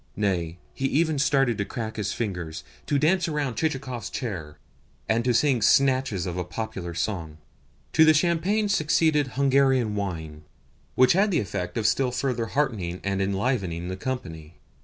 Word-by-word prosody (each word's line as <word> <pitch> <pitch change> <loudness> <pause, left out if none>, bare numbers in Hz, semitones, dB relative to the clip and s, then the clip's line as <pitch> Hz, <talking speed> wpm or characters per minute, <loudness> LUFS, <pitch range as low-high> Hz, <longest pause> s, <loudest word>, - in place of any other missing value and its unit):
Nay, 90 -5 -1 0.2
he 135 - -1
even 155 +1 +1
started 135 -6 +2
to 100 - 0
crack 110 0 -5
his 105 -3 -2
fingers, 90 -8 -4 0.2
to 145 - +2
dance 170 +5 +2
around 150 -5 -1
Chichikov's 135 -8 -3
chair, 80 - -5 0.5
and 115 +1 +1
to 125 - +2
sing 125 +1 +2
snatches 130 -4 +3
of 90 -1 -4
a 90 - -1
popular 90 -3 -5
song. 85 -5 -3 0.6
To 160 - +6
the 155 0 +6
champagne 175 +7 +1
succeeded 155 -6 +2
Hungarian 135 -4 +3
wine, 80 -7 -4 0.5
which 130 0 +5
had 200 +4 +3
the 185 - +2
effect 90 -2 -4
of 110 - -1
still 125 +4 +2
further 125 -2 -2
heartening 105 -11 -1
and 100 0 -1
enlivening 95 -4 -1
the 95 - -3
company. 85 -9 -6
115 Hz, 160 wpm, -25 LUFS, 95-140 Hz, 0.6 s, To